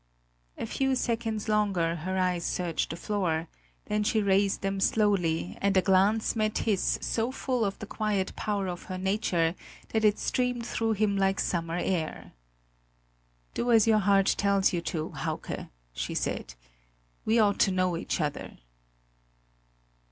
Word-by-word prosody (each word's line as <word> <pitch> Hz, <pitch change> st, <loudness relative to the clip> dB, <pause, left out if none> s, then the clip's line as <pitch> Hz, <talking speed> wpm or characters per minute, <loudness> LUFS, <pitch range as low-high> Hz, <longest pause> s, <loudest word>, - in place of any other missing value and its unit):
A -, -, -3 dB
few 270 Hz, -1 st, 0 dB
seconds 230 Hz, -3 st, -2 dB
longer 195 Hz, -6 st, +1 dB
her 185 Hz, +4 st, -3 dB
eyes 180 Hz, -2 st, +1 dB
searched 170 Hz, -3 st, -1 dB
the -, -, -4 dB
floor; 170 Hz, -4 st, -1 dB, 0.4 s
then 210 Hz, 0 st, 0 dB
she 220 Hz, +1 st, +2 dB
raised 200 Hz, -1 st, +2 dB
them 195 Hz, 0 st, -1 dB
slowly, 180 Hz, -, +1 dB
and 200 Hz, -1 st, +2 dB
a -, -, +6 dB
glance 200 Hz, +4 st, +3 dB
met 215 Hz, -1 st, 0 dB
his 205 Hz, -4 st, +1 dB
so 230 Hz, +2 st, 0 dB
full 255 Hz, -3 st, -1 dB
of 195 Hz, -2 st, -1 dB
the -, -, -7 dB
quiet 210 Hz, -3 st, -2 dB
power 205 Hz, -2 st, -1 dB
of 175 Hz, -2 st, -5 dB
her 185 Hz, -, -5 dB
nature 185 Hz, -4 st, +1 dB, 0.4 s
that 220 Hz, -1 st, 0 dB
it 210 Hz, -1 st, +4 dB
streamed 250 Hz, -2 st, -1 dB
through 225 Hz, -1 st, 0 dB
him 205 Hz, -1 st, +1 dB
like 195 Hz, 0 st, +2 dB
summer 165 Hz, -1 st, -1 dB
air. 175 Hz, -3 st, -2 dB, 1.2 s
"Do 240 Hz, -, 0 dB
as 225 Hz, -3 st, +6 dB
your 220 Hz, -1 st, +4 dB
heart 195 Hz, -1 st, +4 dB
tells 200 Hz, -2 st, +3 dB
you 175 Hz, -, 0 dB
to, 160 Hz, -4 st, -3 dB
Hauke!" -, -, -4 dB, 0.2 s
she -, -, -4 dB
said; -, -, -3 dB, 0.7 s
"we 220 Hz, +2 st, +2 dB
ought 205 Hz, -3 st, +3 dB
to 195 Hz, -, +4 dB
know 185 Hz, -1 st, +1 dB
each 165 Hz, -, -2 dB
other!" 150 Hz, -3 st, -3 dB
195 Hz, 155 wpm, -28 LUFS, 180-215 Hz, 1.2 s, a